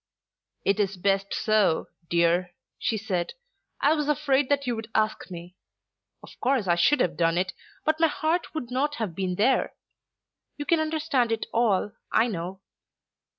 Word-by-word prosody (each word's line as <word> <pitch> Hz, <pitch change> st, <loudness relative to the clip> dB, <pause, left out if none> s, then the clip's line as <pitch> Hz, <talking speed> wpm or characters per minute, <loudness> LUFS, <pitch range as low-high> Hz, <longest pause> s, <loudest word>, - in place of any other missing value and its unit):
"It 200 Hz, +1 st, +2 dB
is 195 Hz, -2 st, 0 dB
best 195 Hz, +1 st, +1 dB
so, 215 Hz, -7 st, +2 dB, 0.2 s
dear," 170 Hz, +1 st, +2 dB, 0.2 s
she 225 Hz, -, 0 dB
said. 190 Hz, -5 st, -2 dB, 0.5 s
"I 290 Hz, -, +5 dB
was 300 Hz, -2 st, -1 dB
afraid 290 Hz, -2 st, +2 dB
that 280 Hz, -1 st, +1 dB
you 245 Hz, -1 st, 0 dB
would 225 Hz, 0 st, -7 dB
ask 215 Hz, -2 st, 0 dB
me. 175 Hz, 0 st, -9 dB, 0.7 s
Of -, -, -14 dB
course 260 Hz, -5 st, +1 dB
I 175 Hz, -, +3 dB
should 175 Hz, +12 st, +3 dB
have 180 Hz, -, +1 dB
done 165 Hz, 0 st, +2 dB
it, 190 Hz, +1 st, 0 dB, 0.3 s
but 310 Hz, +1 st, +2 dB
my 325 Hz, -, +5 dB
heart 320 Hz, +2 st, -1 dB
would 250 Hz, -6 st, -4 dB
not 290 Hz, +4 st, 0 dB
have 220 Hz, -, -3 dB
been 185 Hz, 0 st, -2 dB
there. 240 Hz, +8 st, +2 dB, 0.8 s
You 290 Hz, -, -4 dB
can 335 Hz, +1 st, +3 dB
understand 310 Hz, -6 st, 0 dB
it 225 Hz, -, -1 dB
all, 210 Hz, -4 st, +2 dB, 0.2 s
I 225 Hz, -, +4 dB
know." 190 Hz, -3 st, -4 dB
220 Hz, 165 wpm, -26 LUFS, 185-285 Hz, 0.8 s, I